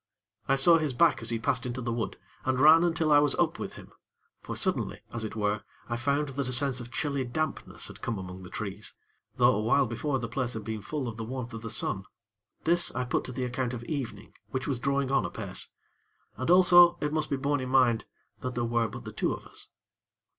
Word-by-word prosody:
I 135 Hz, -, +4 dB
saw 165 Hz, +5 st, +6 dB
his 150 Hz, -4 st, -1 dB
back 115 Hz, -, +4 dB
as 115 Hz, -, 0 dB
he 115 Hz, -, +1 dB
passed 115 Hz, -, 0 dB
into 125 Hz, 0 st, -4 dB
the 120 Hz, -1 st, -2 dB
wood, 115 Hz, -1 st, -3 dB, 0.3 s
and 130 Hz, -1 st, 0 dB
ran 155 Hz, +4 st, +8 dB
until 165 Hz, -2 st, +1 dB
I 145 Hz, -, +8 dB
was 145 Hz, -1 st, +3 dB
up -, -, +1 dB
with -, -, -5 dB
him; -, -, -12 dB, 0.5 s
for, -, -, -6 dB
suddenly, -, -, -1 dB
as 115 Hz, -1 st, -2 dB
it 110 Hz, -, -5 dB
were, 105 Hz, -1 st, 0 dB, 0.3 s
I 120 Hz, -, -1 dB
found 140 Hz, +4 st, 0 dB
that 135 Hz, -1 st, -3 dB
a -, -, -1 dB
sense 130 Hz, 0 st, +2 dB
of 120 Hz, 0 st, -9 dB
chilly 140 Hz, -3 st, -1 dB
dampness 150 Hz, +5 st, -2 dB
had -, -, -11 dB
come 115 Hz, -, -2 dB
among 95 Hz, 0 st, -7 dB
the 90 Hz, -, -10 dB
trees; 105 Hz, 0 st, -4 dB, 0.4 s
though -, -, +5 dB
a 105 Hz, -, 0 dB
while 125 Hz, +6 st, +3 dB
before 135 Hz, +4 st, -2 dB
the 115 Hz, -2 st, -4 dB
place 120 Hz, +1 st, -2 dB
had 110 Hz, -, -5 dB
been 110 Hz, 0 st, -4 dB
full 140 Hz, +3 st, -4 dB
of 115 Hz, -2 st, -6 dB
the 115 Hz, -, -4 dB
warmth 125 Hz, 0 st, -5 dB
of 115 Hz, -, -6 dB
the 115 Hz, -, -6 dB
sun. 95 Hz, -2 st, -1 dB, 0.6 s
This, 170 Hz, +1 st, +4 dB
I 130 Hz, -, 0 dB
put 125 Hz, -, 0 dB
to -, -, -5 dB
the 125 Hz, +1 st, -3 dB
account 125 Hz, 0 st, -2 dB
of 120 Hz, -, -7 dB
evening, 140 Hz, -2 st, -5 dB, 0.2 s
which 130 Hz, 0 st, -3 dB
was 135 Hz, -5 st, -1 dB
drawing 140 Hz, +1 st, 0 dB
on 135 Hz, -, +3 dB
apace; 85 Hz, -, -5 dB, 0.7 s
and 130 Hz, -, -3 dB
also, 175 Hz, -1 st, +7 dB
it 150 Hz, 0 st, -2 dB
must 155 Hz, -1 st, 0 dB
be 140 Hz, -, 0 dB
borne 145 Hz, +1 st, 0 dB
in 130 Hz, -, -4 dB
mind, 125 Hz, -4 st, +3 dB, 0.3 s
that 125 Hz, -1 st, -4 dB
there 120 Hz, -, 0 dB
were 115 Hz, 0 st, +1 dB
but -, -, -9 dB
the -, -, -8 dB
two -, -, 0 dB
of -, -, -6 dB
us. -, -, -9 dB
130 Hz, 235 wpm, -28 LUFS, 115-140 Hz, 0.7 s, ran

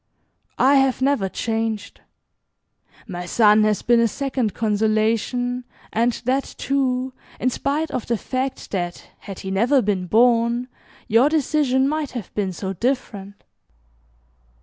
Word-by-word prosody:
I 275 Hz, +2 st, +5 dB
have 270 Hz, -1 st, +2 dB
never 265 Hz, -9 st, +1 dB
changed. 225 Hz, 0 st, -3 dB, 1.1 s
My 180 Hz, -3 st, -6 dB
son 215 Hz, +1 st, +5 dB
has 210 Hz, -1 st, 0 dB
been 240 Hz, 0 st, +4 dB
a 230 Hz, -, +4 dB
second 255 Hz, -3 st, -2 dB
consolation, 220 Hz, +3 st, 0 dB, 0.3 s
and 235 Hz, +2 st, +2 dB
that, 265 Hz, +2 st, -1 dB
too, 260 Hz, -2 st, -1 dB, 0.3 s
in 255 Hz, -, +1 dB
spite 295 Hz, +5 st, -1 dB
of 250 Hz, -, -4 dB
the 235 Hz, -, 0 dB
fact 260 Hz, +3 st, -4 dB
that, 175 Hz, -3 st, -4 dB
had 195 Hz, -3 st, -9 dB
he 190 Hz, -, -5 dB
never 235 Hz, +8 st, +3 dB
been 195 Hz, -5 st, -1 dB
born, 235 Hz, +3 st, +3 dB, 0.4 s
your 235 Hz, +5 st, +4 dB
decision 285 Hz, -3 st, +2 dB
might 305 Hz, -2 st, -2 dB
have 235 Hz, -7 st, -7 dB
been 200 Hz, -3 st, -1 dB
so 190 Hz, +2 st, -4 dB
different. 205 Hz, -3 st, -3 dB
235 Hz, 130 wpm, -22 LUFS, 210-260 Hz, 1.1 s, I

